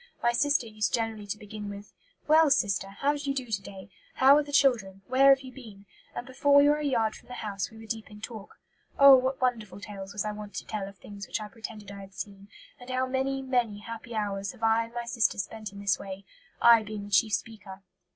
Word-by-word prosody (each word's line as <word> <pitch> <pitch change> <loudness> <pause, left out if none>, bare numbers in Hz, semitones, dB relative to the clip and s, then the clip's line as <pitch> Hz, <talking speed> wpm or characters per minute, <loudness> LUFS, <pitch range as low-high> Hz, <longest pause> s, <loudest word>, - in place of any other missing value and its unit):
My 235 - +4
sister 285 +1 +2
used 215 -4 -1
generally 225 -3 -3
to 205 - -3
begin 210 0 -8
with, 200 0 -10 0.3
'Well, 315 0 +6
sister, 200 -8 +1
how 275 +9 0
do - - -5
you 280 -1 -2
do 260 -2 -2
to 200 -2 -1
day? 190 -1 -11 0.2
How 270 +2 +7
are 300 - +4
the 290 -1 -8
children? 225 -9 +2
Where 265 +2 +5
have 270 -1 +6
you 260 -1 -10
been?' 220 -6 -13 0.3
and 240 - -5
before 275 +2 +2
we 285 0 +7
were 295 +1 +3
a - - -4
yard 230 -6 +1
from - - -15
the 250 - -8
house 200 -4 -4
we 220 - -15
were 225 - -11
deep 220 0 -5
in 210 -1 -12
talk. 220 -2 -9 0.4
Oh, 275 -1 +10
what 260 +1 0
wonderful 230 -6 -1
tales 200 -1 -8
was 205 +1 -3
I 210 - -1
wont 210 -1 -9
to - - -5
tell 210 -3 -4
of 200 - -16
things 200 +1 -10
which - - -2
I 210 -1 -7
pretended 215 -2 -9
I 200 0 -9
had 195 -1 -13
seen, 200 0 -8 0.3
and 245 +1 -12
how 255 0 0
many, 265 +1 -1
many 245 -5 0
happy 230 +1 -8
hours 200 -2 -2
have 225 - -14
I 225 +1 +3
and 230 - -15
my 240 0 -3
sister 235 -1 +1
spent 215 +1 -5
in 200 - -11
this 200 -1 +1
way, 195 0 -8 0.3
I 235 -1 +7
being 210 -1 -6
the 205 - -11
chief 215 +2 +3
speaker." 200 0 -5
220 Hz, 245 wpm, -28 LUFS, 200-255 Hz, 0.4 s, Oh